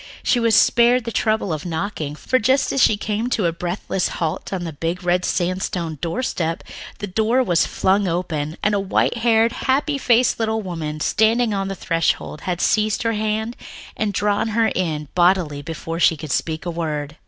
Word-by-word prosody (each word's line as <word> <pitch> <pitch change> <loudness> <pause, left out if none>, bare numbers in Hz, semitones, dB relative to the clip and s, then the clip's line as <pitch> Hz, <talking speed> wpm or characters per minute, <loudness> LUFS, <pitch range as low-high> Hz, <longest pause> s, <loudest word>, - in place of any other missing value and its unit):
She 245 - +2
was 230 -2 +3
spared 240 +3 +4
the 230 - -4
trouble 215 -6 0
of 155 - -4
knocking, 160 -3 -3
for 255 +11 0
as 270 0 +2
she 215 - +4
came 215 +3 -2
to 220 -6 0
a 170 - +2
breathless 180 +2 -2
halt 165 +1 -3
on 185 -2 -3
the 165 -2 -5
big 165 +5 -3
red 180 0 +1
sandstone 175 -4 -2
doorstep, 165 -4 -2 0.3
the - - -4
door 220 +6 +1
was 175 -7 +2
flung 195 +1 +1
open, 165 -3 -2
and 210 - +2
the 205 - +2
white 195 +4 +1
haired, 230 0 +3
happy 280 +3 0
faced 245 -1 +3
little 220 -1 0
woman 155 -4 -5
standing 225 +4 +2
on 195 -1 -1
the 195 - -4
threshold 165 -3 -1
had 175 -1 -1
seized 215 +1 +1
her 230 0 +1
hand 220 +2 -2 0.4
and 215 -2 -1
drawn 205 +2 0
her 225 -1 +4
in 155 -5 -2
bodily 175 -5 +2
before 165 +1 -5
she 165 -2 +4
could 150 -1 -7
speak 160 +4 -2
a 175 - -2
word. 155 -3 -3
190 Hz, 185 wpm, -21 LUFS, 165-220 Hz, 0.4 s, spared